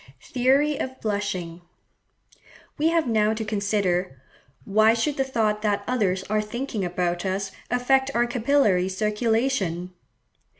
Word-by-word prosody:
Theory 275 +3 +2
of 260 0 -4
Blushing.—We 200 - -6
have 330 -1 +2
now 220 -1 +2
to 220 0 -4
consider, 200 -7 -1 0.5
why 215 +2 +4
should 280 +5 0
the 270 - +1
thought 220 -5 0
that 205 -1 0
others 195 -7 0
are 215 +2 0
thinking 220 0 -4
about 175 -1 -1
us 195 +1 -2 0.2
affect 265 +2 +2
our 240 0 +3
capillary 235 -7 +2
circulation? 210 -3 -1
215 Hz, 120 wpm, -24 LUFS, 190-250 Hz, 0.5 s, why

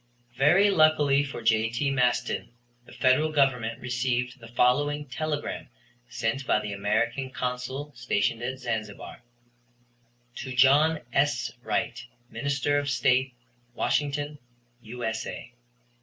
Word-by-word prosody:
Very 175 +10 +5
luckily 150 -4 +4
for 135 -4 -7
J.T. 115 +5 +1
Maston, 125 -2 0 0.4
the - - -14
Federal 140 +5 +2
Government 125 -6 +1
received 125 0 -2
the 115 - -12
following 145 +5 +1
telegram 145 +3 -4 0.4
sent 125 +2 -2
by - - +3
the 105 -1 -5
American 115 +6 -1
Consul 130 +3 -4
stationed 115 -2 -1
at 130 +2 -3
Zanzibar: 110 -5 -5 1.2
"To 130 -1 -6
John 145 +5 +5
S. 145 +1 +1
Wright, - - -2 0.3
Minister 140 0 0
of 145 0 -3
State, 130 -1 +2 0.4
Washington, 145 +1 -1 0.4
U.S.A. 115 0 -5
130 Hz, 110 wpm, -27 LUFS, 120-145 Hz, 1.2 s, Very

